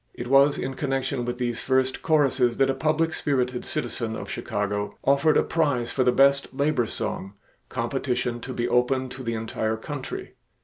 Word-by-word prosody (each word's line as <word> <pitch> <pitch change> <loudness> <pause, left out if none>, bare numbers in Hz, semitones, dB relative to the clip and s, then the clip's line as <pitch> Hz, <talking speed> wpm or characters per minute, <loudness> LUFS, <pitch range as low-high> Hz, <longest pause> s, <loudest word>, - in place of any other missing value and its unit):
It 120 - -5
was 140 +1 +5
in 135 - -3
connection 135 -3 -2
with 120 0 -3
these 120 -2 -2
first 130 0 +1
choruses 135 -6 +2
that 135 0 +3
a - - -1
public 155 +4 +1
spirited 125 -3 -1
citizen 115 -7 -3
of - - -6
Chicago 105 -1 -3
offered 140 +3 +4
a - - +4
prize 145 -8 0
for 130 - +1
the 125 - +4
best 140 +2 +3
labor 135 -3 +1
song, 95 -1 -4 0.4
competition 125 -2 -2
to 130 - -7
be 120 -1 -1
open 130 +2 +1
to 130 +1 -8
the 115 -2 -2
entire 110 0 -2
country. 135 +3 -6
130 Hz, 175 wpm, -25 LUFS, 120-140 Hz, 0.4 s, was